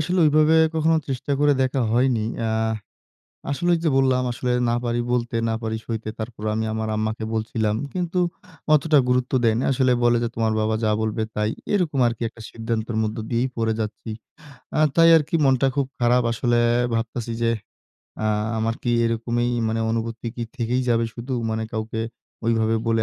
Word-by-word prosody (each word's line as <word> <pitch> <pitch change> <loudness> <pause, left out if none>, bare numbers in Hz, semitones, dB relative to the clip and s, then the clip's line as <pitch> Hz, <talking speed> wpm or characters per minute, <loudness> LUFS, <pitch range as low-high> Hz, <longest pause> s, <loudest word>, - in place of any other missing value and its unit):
আসলে 180 +4 0
ওইভাবে 155 +1 +4 0.2
কখনো 160 +1 +3
চেষ্টা 135 +1 -2
করে 145 0 +5
দেখা 130 +1 0
হয়নি। 120 -2 +2 0.2
এ্যা 115 -1 0 1.0
আসলেই 175 +4 +2
যে, 165 - +3
বললাম, 130 -1 +3
আসলে 125 +1 -2 0.2
না 120 - +2
পারি 120 0 0
বলতে, 120 -1 -1
না 110 - 0
পারি 110 0 -2
সইতে। 110 -1 -4
তারপর 110 -1 -6
আমি 110 +1 -1
আমার 110 0 -2
আম্মাকে 110 +1 -2
বলছিলাম। 110 -1 -1 0.2
কিন্তু 180 0 -1 0.5
অতটা 155 +1 +4
গুরুত্ব 125 0 +1
দেয়নি। 115 +2 +2
আসলে 130 -1 +2
বলে 120 0 +4
যে, - - +1
তোমার 110 -1 +1
বাবা 110 0 +1
যা 110 - +2
বলবে 110 0 -1
তাই। 105 0 +1 0.2
এরকম 170 -9 +1
আরকি 115 -1 -3
একটা 115 - -14
সিদ্ধান্তের 115 0 -3
মধ্যে 110 +1 -3
দিয়েই 120 +2 +1
পড়ে 115 -1 0
যাচ্ছি। 110 +1 -4 0.6
এ্যা - - +1 0.2
তাই 165 0 +7
আরকি 155 +1 -1
মনটা 135 0 +3
খুব 140 -1 +1
খারাপ, 120 +1 +3
আসলে 120 +1 +1 0.4
ভাবতাছি 115 0 -3
যে, 115 0 +3 0.7
এ্যা 110 - 0 0.3
আমার 115 +1 0
কি 120 - 0
এরকমই 120 +1 0 0.2
মানে 110 +1 -1
অনুভূতি 115 +1 -3
কি 120 - -3
থেকেই 120 +2 0
যাবে 115 -1 +3
শুধু 125 +3 -6 0.2
মানে 110 0 -1
কাউকে 110 0 -3 0.5
ওইভাবে 115 -1 +2
বলে 115 -1 +2
115 Hz, 170 wpm, -23 LUFS, 110-130 Hz, 1.0 s, তাই